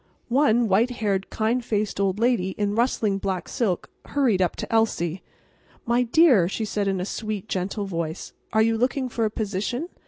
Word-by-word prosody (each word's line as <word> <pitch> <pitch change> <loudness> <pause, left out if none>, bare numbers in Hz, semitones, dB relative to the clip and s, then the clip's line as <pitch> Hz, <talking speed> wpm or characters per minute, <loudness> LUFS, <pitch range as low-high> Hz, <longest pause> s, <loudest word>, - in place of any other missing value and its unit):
One 240 -3 +3
white 215 +5 +3
haired, 205 -5 -1
kind 230 +3 0
faced 210 -3 -1
old 195 -1 +1
lady 220 -5 +1
in 205 -1 0
rustling 220 -3 +1
black 190 -2 -3
silk 215 -9 -1 0.2
hurried 245 -10 +1
up 180 - +1
to - - -6
Elsie. 190 -6 +1 0.6
"My 240 0 +2
dear," 245 - +5
she 220 +2 -2
said 205 -1 -1
in 195 -1 0
a 180 - -2
sweet, 215 -1 -4
gentle 195 +3 -2
voice, 165 -4 -4 0.2
"are 220 +1 +4
you 225 0 +1
looking 255 +1 0
for 230 -1 -1
a - - +1
position? 215 - -3
215 Hz, 180 wpm, -24 LUFS, 195-235 Hz, 0.6 s, dear